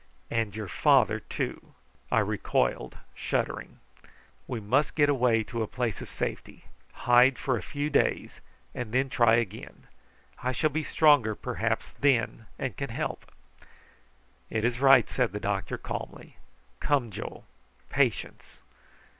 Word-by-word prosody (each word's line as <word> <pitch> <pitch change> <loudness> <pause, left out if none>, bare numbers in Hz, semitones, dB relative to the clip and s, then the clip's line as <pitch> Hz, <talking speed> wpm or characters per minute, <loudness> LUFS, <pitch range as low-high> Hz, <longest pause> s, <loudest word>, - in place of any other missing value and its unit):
"And 110 -3 -1
your 110 -2 -5
father - - +3
too." - - -5 0.4
I - - +4
recoiled - - -1 0.2
shuddering. - - -3 0.7
"We 120 - -3
must 130 +8 +1
get 145 -2 +4
away 120 -5 +3
to 115 +2 -4
a 110 - -1
place 120 -3 -3
of - - -8
safety, - - -5 0.4
hide 125 +2 +6
for 130 -2 0
a 110 - -3
few 145 +1 -3
days, 140 - 0 0.3
and 120 -3 -5
then 130 +1 +2
try 120 -2 +4
again. 115 -2 -4 0.6
I 130 +1 -1
shall 155 +4 +1
be 155 +3 -1
stronger 145 -9 +4
perhaps - - -2
then, 120 -5 +1
and 130 - -3
can 140 - -4
help." 115 - -4 1.2
"It 110 0 -1
is 120 0 0
right," 135 -3 +6
said 125 -5 0
the 105 - -3
doctor 100 -1 -2
calmly. - - -7 0.4
"Come, 135 -6 +1
Joe. - - -7 0.5
Patience!" - - -1
125 Hz, 140 wpm, -28 LUFS, 110-135 Hz, 1.2 s, hide